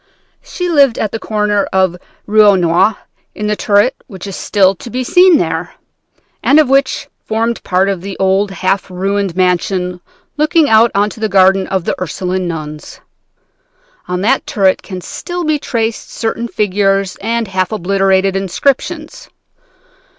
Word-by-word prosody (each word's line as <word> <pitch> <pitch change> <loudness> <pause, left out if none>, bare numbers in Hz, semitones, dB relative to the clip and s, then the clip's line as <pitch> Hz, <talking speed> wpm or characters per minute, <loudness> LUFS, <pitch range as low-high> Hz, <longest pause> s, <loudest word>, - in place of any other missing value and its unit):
She 360 - -5
lived 280 -7 +3
at 215 - -2
the 225 - -4
corner 210 -2 0
of 190 -1 +2
the 175 - -13 0.3
Rue 215 +1 +4
aux 205 -1 +6
Nonnes, 180 +4 +2 0.4
in 210 - -4
the 210 0 0
turret 205 +5 +2
which 190 -5 -9
is 195 -2 -6
still 195 -2 +2
to 195 - -11
be 255 +3 -3
seen 360 +5 +5
there, - - -3 0.7
and 300 +1 +4
which 270 0 +1 0.2
formed 225 +1 -1
part 185 +2 +1
of 190 -3 -2
an 195 -1 -6
old 195 +1 +2
half 190 0 -1
ruined 195 0 -2
mansion 180 0 0 0.4
looking 305 +1 +3
on 220 -2 +4
to - - -11
the 220 -1 -1
garden 190 0 +3
of 190 -3 -2
the - - 0
Ursuline 185 +1 -3
nuns. 155 -2 -7 1.1
On 180 0 -2
that 245 +7 +1
turret 190 -3 +1
can 185 -2 -8
still 350 - -5
be 310 -2 0
traced 230 -4 -3
certain 230 +1 -3
figures 195 -2 0
and 230 +1 -2
half 185 -1 -1
obliterated 195 -1 +1
inscriptions. 280 - -2
200 Hz, 155 wpm, -14 LUFS, 185-230 Hz, 1.1 s, aux